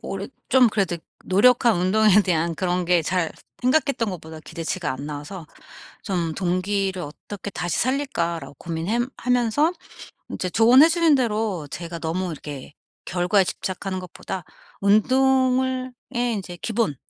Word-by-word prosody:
올해 195 +1 -5 0.2
좀 255 -2 +6
그래도 195 -5 0 0.3
노력한 235 +3 +4
운동에 205 +3 +4
대한 170 -2 0
그런 180 +1 -1
게 175 -1 +3
잘 175 0 0 0.3
생각했던 255 -5 +2
것보다 160 -3 -8
기대치가 165 0 -4
안 135 +2 -6
나와서 150 +4 -7 0.6
좀 175 -5 -1
'동기를 190 +1 -1
어떻게 190 +6 -8
다시 175 -2 -2
살릴까.'라고 170 - -1
고민해 170 - -2 0.2
하면서 250 +6 +2 0.6
인제 185 - -3
조언해 245 - +7
주신 335 -2 +4
대로 215 - -1
제가 170 -1 -6
너무 175 +3 -2
이렇게 145 -2 -8 0.3
결과에 185 +2 +2
집착하는 185 +1 -4
것보다 180 -1 -7 0.4
운동을 260 +4 +2 0.2
예 240 0 +1
인제 190 -4 -5
기본 220 - -1
190 Hz, 305 characters per minute, -23 LUFS, 170-235 Hz, 0.6 s, 조언해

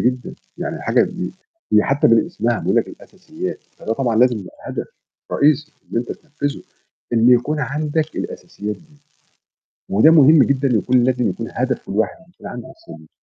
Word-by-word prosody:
جدًا، 125 +1 -1 0.2
يعني - - -4
حاجة - - +3
دي - - -3 0.4
هي 105 - +6
حتى 145 +2 +2
من 115 -3 +4
اسمها 120 -9 -1
بيقول - - 0
لك - - +2
الأساسيات، - - -7 0.2
فده 110 - -3
طبعًا 120 -2 0
لازم 120 -1 +4
يبقى 95 - -11
هدف - - -4 0.5
رئيسي 150 +1 +2 0.2
إن - - -2
أنت 120 - -3
تنفذه 145 -2 -5 0.5
إن 115 0 +4
يكون 125 +5 +3
عندك 150 +2 -2
الأساسيات 105 +1 -5
دي. 160 -3 -22 0.9
وده 110 +11 +6
مهم 155 -2 +7
جدًا 140 0 +1
يكون 125 +3 +2
لازم 125 -1 +1
يكون 115 - -5
هدف 130 +2 -2
كل - - -7
واحد 105 +3 0
إن 165 - -20
يكون 175 - -12
عنده 120 -1 -8
أساسيات. 330 +1 -14
130 Hz, 170 wpm, -20 LUFS, 115-150 Hz, 0.9 s, مهم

